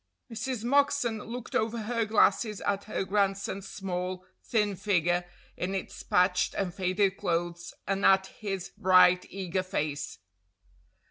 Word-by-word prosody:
Mrs. 240 0 -3
Moxon 280 -3 +2
looked 235 +3 -7
over 225 +1 0
her 230 +1 0
glasses 215 0 +2
at 200 0 -1
her 215 - -2
grandson's 195 0 -1
small, 185 -1 -4 0.2
thin 210 -3 0
figure 175 -2 +1 0.3
in 190 +2 -3
its 190 - -5
patched 180 0 +2
and 185 -3 -2
faded 190 +1 +1
clothes, 170 0 -2
and 195 +1 -1
at 190 0 +5
his 195 -2 -5
bright, 185 -2 +5
eager 185 -1 -2
face. 150 -5 -3
195 Hz, 130 wpm, -29 LUFS, 180-215 Hz, 0.3 s, at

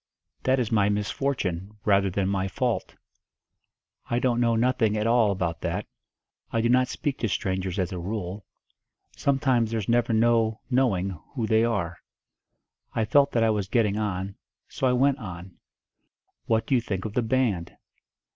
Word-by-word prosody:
"That 130 0 +3
is 120 -3 -1
my 105 -2 +3
misfortune, 105 -3 -2
rather 100 -1 +3
than 95 +1 -1
my 95 -1 0
fault." - - -2 1.1
"I 120 - +1
don't 120 -1 +1
know 115 -1 +3
nothing 115 -2 +2
at 105 - 0
all 115 -2 +4
about 90 -5 -2
that. - - -2 0.7
I 115 - 0
do 115 +1 +2
not 125 +1 +4
speak 140 +1 -3
to 115 - 0
strangers 95 0 -2
as 90 -3 -1
a 90 - -4
rule. 95 +1 -4 0.7
Sometimes 130 -5 +1
there's 110 -3 -2
never 120 0 +2
no 115 -1 +2
knowing 100 -9 +1 0.2
who 120 -4 -1
they 110 +1 +3
are." 95 -7 -1 1.0
I 115 - +1
felt 140 +5 +4
that 115 - +3
I 110 - +4
was 105 -3 -1
getting 105 -1 +1
on 100 -2 -3 0.3
so 130 - -1
I 125 - +3
went 135 +2 +3
on. 90 -4 -9 0.9
"What 115 -1 +1
do - - -1
you 125 - +4
think 100 -4 -4
of 105 - -4
the 125 - +1
band?" 115 -7 0
110 Hz, 165 wpm, -26 LUFS, 95-120 Hz, 1.1 s, all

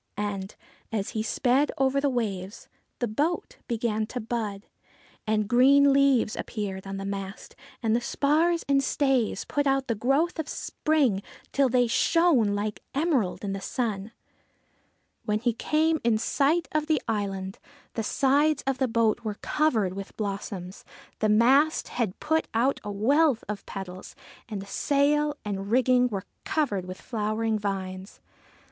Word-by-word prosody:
And, 200 -1 -3 0.4
as 205 -3 -2
he 220 - -2
sped 255 +5 +2
over 270 +1 +2
the 285 - +2
waves, 205 -6 -3 0.3
the 240 - -1
boat 295 +11 -2
began 220 -2 -1
to 250 - -5
bud; 215 -3 -4 0.6
and 215 -1 +1
green 275 +4 +6
leaves 275 -5 +3
appeared 195 -3 -5
on 195 0 -4
the 195 - -5
mast, 195 0 -6 0.3
and 225 0 +2
the 240 - +1
spars 315 +7 +1
and 275 -1 +3
stays 265 -8 +1
put 290 -1 0
out 270 0 +2
the 230 - +1
growth 275 - +1
of 310 - -3
spring, 280 -11 0 0.3
till 275 -2 +3
they 245 0 +3
shone 255 - +3
like 210 +1 -3
emerald 275 - 0
in 195 -1 -2
the 195 - -5
sun. 215 -3 -3 1.1
When 210 -1 +1
he 235 +2 0
came 315 +6 +1
in 230 -2 +3
sight 285 +8 +1
of 305 0 0
the 310 -3 +2
island, 195 -3 -3 0.3
the 225 - -2
sides 280 +6 +2
of 270 -1 -1
the 260 - +2
boat 230 -1 +1
were 215 -3 -4
covered 225 -12 +1
with 195 +1 -8
blossoms, 195 -3 -5 0.4
the 215 - +2
mast 265 +8 +4
had 225 -7 -2
put 315 +1 0
out 255 +5 +2
a 205 - -4
wealth 265 +5 +3
of 210 -1 -5
petals, 185 -2 -8 0.3
and 205 -3 -4
the - - -11
sail 290 +5 +1
and 200 -1 -4
rigging 250 +1 +4
were 200 -5 -4 0.2
covered 210 - -1
with 185 0 -8
flowering 220 -1 -1
vines. 190 -1 -4
230 Hz, 155 wpm, -27 LUFS, 205-280 Hz, 1.1 s, green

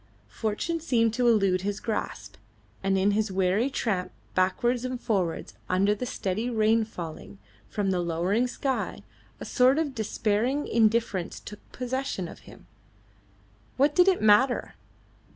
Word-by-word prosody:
Fortune 225 +10 -2
seemed 230 -8 +1
to 245 +1 +1
elude 195 -5 +3
his 205 +1 -3
grasp, 225 -2 -4 0.4
and 195 0 +1
in 195 +2 +3
his 210 0 0
weary 190 +6 +1
tramp 195 -9 -2 0.2
backwards 240 +7 +1
and 255 -1 -3
forwards 190 -9 -1 0.2
under 195 +3 +3
the 245 +4 -4
steady 215 +3 -2
rain 225 -1 +3
falling 160 - -8 0.3
from 200 -3 -1
the 180 - 0
lowering 175 +8 0
sky, 265 +1 -3 0.4
a - - -6
sort 255 +2 +4
of 310 -4 -1
despairing 225 +4 0
indifference 220 -5 +1
took 210 - -10
possession 255 -6 -3
of - - -11
him. - - -15 1.1
What 280 +2 +3
did 360 +4 +5
it 375 - +3
matter? 230 +5 +4
220 Hz, 140 wpm, -27 LUFS, 195-250 Hz, 1.1 s, did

